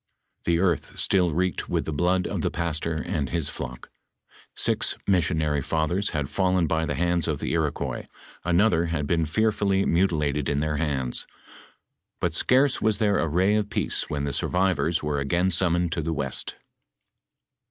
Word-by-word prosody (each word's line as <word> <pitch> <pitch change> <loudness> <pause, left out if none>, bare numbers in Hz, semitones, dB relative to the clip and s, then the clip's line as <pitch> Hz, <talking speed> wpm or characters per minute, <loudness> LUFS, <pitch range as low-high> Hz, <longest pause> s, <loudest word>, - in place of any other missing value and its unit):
The 85 -1 +2
earth 85 -3 0
still 90 -3 +2
reeked 90 +3 -1
with - - 0
the 80 - -3
blood 90 +4 +1
of - - -2
tho - - +1
pastor 80 -1 -2
and 80 -4 -2
his 80 +1 -1
flock; - - -7 0.6
six - - +1
missionary 80 -6 +1
fathers 80 +7 0
had 75 -4 -2
fallen 90 -1 +1
by 80 +1 0
the 75 - -1
hands 85 0 +1
of - - 0
the - - -3
Iroquois, 80 -3 -2 0.4
another 90 0 +3
had 80 -3 -2
been 80 +1 +1
fearfully 100 +1 +1
mntil 85 -3 +2
ated 70 -1 -1
in 70 - 0
their 75 0 -1
hands. 70 -5 -2 0.9
But 85 -2 0
scarce 130 - +3
was 110 -1 +2
there 105 -3 +2
a 85 - +1
ray 90 +6 +2
of 105 -1 0
peace - - -1
when 70 -1 -2
the 70 -1 -2
survivors, 90 -2 +1
were 75 -1 -1
again 85 +7 +1
summoned 85 -1 +2
to 80 - -1
the 80 +1 -2
west. 65 -3 -2
85 Hz, 170 wpm, -25 LUFS, 75-95 Hz, 0.9 s, another